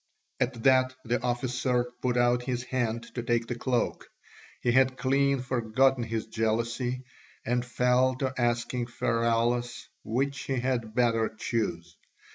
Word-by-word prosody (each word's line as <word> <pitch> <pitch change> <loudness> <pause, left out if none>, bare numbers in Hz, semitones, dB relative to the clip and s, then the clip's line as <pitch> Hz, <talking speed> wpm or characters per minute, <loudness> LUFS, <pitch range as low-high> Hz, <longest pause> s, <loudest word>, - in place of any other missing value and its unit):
At 125 -2 -1
that 130 -1 +4
the 120 0 0
officer 125 0 0 0.2
put 125 -1 0
out 120 0 +3
his 125 -2 -2
hand 120 -3 -1
to 120 - -3
take 120 0 0
the 120 - -3
cloak; 120 0 -1 0.5
he 120 - +1
had 130 +1 +3
clean 140 +1 +2
forgotten 125 +1 +2
his 115 -1 -3
jealousy, 115 +3 -1 0.4
and 120 +1 +1
fell 125 +1 +2
to 130 0 -2
asking 120 0 0
Pheraulas 120 +1 0
which 135 +4 -1
he 135 - -1
had 120 -3 -2
better 115 -2 +2
choose. 110 -6 -3
120 Hz, 135 wpm, -28 LUFS, 115-130 Hz, 0.5 s, that